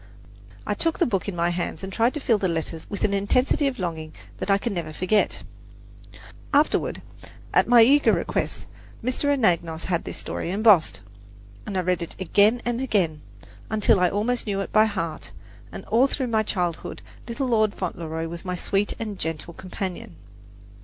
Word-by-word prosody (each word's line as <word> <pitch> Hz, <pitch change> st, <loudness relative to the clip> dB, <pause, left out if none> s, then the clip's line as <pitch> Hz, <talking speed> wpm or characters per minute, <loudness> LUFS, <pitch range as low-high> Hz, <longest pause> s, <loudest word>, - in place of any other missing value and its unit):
I -, -, 0 dB
took 330 Hz, -1 st, -1 dB
the 345 Hz, -, +3 dB
book 195 Hz, -5 st, -1 dB
in 190 Hz, -, -5 dB
my 170 Hz, 0 st, +1 dB
hands 175 Hz, -1 st, -3 dB
and 190 Hz, 0 st, -6 dB
tried 235 Hz, +7 st, +2 dB
to -, -, -2 dB
feel 230 Hz, -6 st, +2 dB
the 190 Hz, -, +1 dB
letters 165 Hz, -1 st, -3 dB
with 200 Hz, -, -4 dB
an 200 Hz, -, +2 dB
intensity 250 Hz, +8 st, +2 dB
of 275 Hz, -, -2 dB
longing 160 Hz, -4 st, -4 dB, 0.3 s
that -, -, -4 dB
I 195 Hz, -, +5 dB
can 225 Hz, +2 st, -3 dB
never 170 Hz, -4 st, -4 dB
forget. 185 Hz, +7 st, 0 dB, 1.1 s
Afterward, 295 Hz, +2 st, +1 dB, 0.5 s
at -, -, +4 dB
my 240 Hz, -1 st, +8 dB
eager 285 Hz, +5 st, +5 dB
request, -, -, -1 dB, 0.4 s
Mr. 255 Hz, +4 st, -1 dB
Anagnos 170 Hz, -, +1 dB
had 175 Hz, -2 st, -1 dB
this -, -, -6 dB
story -, -, -4 dB
embossed, 200 Hz, -, +4 dB, 0.7 s
and 200 Hz, -, -3 dB
I -, -, +2 dB
read 180 Hz, 0 st, 0 dB
it 170 Hz, -, -6 dB
again 205 Hz, +6 st, +3 dB
and 240 Hz, +1 st, -1 dB
again, 180 Hz, -, 0 dB, 0.5 s
until 215 Hz, -1 st, +3 dB
I 180 Hz, -1 st, +4 dB
almost 225 Hz, +5 st, -1 dB
knew 200 Hz, -1 st, -1 dB
it -, -, -5 dB
by 215 Hz, 0 st, +6 dB
heart; 180 Hz, -7 st, -4 dB, 0.4 s
and -, -, -8 dB
all 245 Hz, +5 st, +4 dB
through 265 Hz, -2 st, -2 dB
my 220 Hz, -, +4 dB
childhood 180 Hz, -6 st, -3 dB, 0.2 s
"Little 255 Hz, +2 st, -2 dB
Lord 215 Hz, -3 st, +2 dB
Fauntleroy" 165 Hz, -3 st, -4 dB
was 170 Hz, +1 st, -7 dB
my 180 Hz, -1 st, -3 dB
sweet 195 Hz, +3 st, -1 dB
and 215 Hz, -4 st, -5 dB
gentle 165 Hz, +1 st, -4 dB
companion. 185 Hz, -, -6 dB
195 Hz, 180 wpm, -24 LUFS, 170-230 Hz, 1.1 s, my